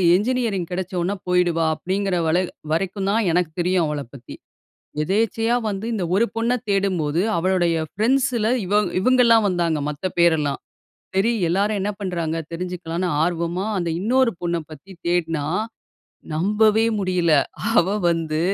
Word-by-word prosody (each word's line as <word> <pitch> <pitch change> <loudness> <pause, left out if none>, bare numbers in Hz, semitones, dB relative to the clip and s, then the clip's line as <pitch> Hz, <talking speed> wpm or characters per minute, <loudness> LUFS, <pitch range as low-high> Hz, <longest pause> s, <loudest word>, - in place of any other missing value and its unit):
Engineering 215 -4 0
கெடைச்சவொன்னே 185 +1 -2
போயிடுவா 175 -2 +2
அப்டிங்கிற 190 +3 -1
வரை 175 +3 +1 0.2
வரைக்கும் 190 +4 -1
தான் 220 -2 +1
எனக்கு 175 -1 +1
தெரியும் 180 0 +2
அவளைப் 145 -5 -5
பத்தி. 130 - -10 0.7
எதேச்சையா 225 +6 +1
வந்து 200 +1 -4
இந்த 200 - -1
ஒரு 230 +4 +4
பொண்ணை 230 +2 +1
தேடும்போது 180 -6 +1 0.2
அவளுடைய 175 -1 +1 0.2
ஃப்ரெண்ட்ஸில 235 +1 +1
இவ 205 +3 +3 0.2
இவங்கள்லாம் 235 -1 +4
வந்தாங்க 170 -4 0
மத்த 150 +5 -4
பேரெல்லாம். 160 -4 +2 0.6
சரி 200 +5 +3 0.2
எல்லாரும் 200 +4 +1
என்ன 200 - -1
பண்றாங்க 170 -4 -2
தெரிஞ்சுக்கலான்னு 180 0 -3
ஆர்வமா 170 +2 -1
அந்த 175 -2 -1
இன்னொரு 250 +3 +3
பொண்ண 170 0 -1
பத்தி 155 +6 -12 0.2
தேடுனா 165 -4 0 0.9
நம்பவே 215 +5 +3
முடியல. 180 -3 +1 0.4
அவ 175 - +5 0.2
வந்து 160 -2 -1
185 Hz, 125 wpm, -22 LUFS, 170-210 Hz, 0.9 s, அவ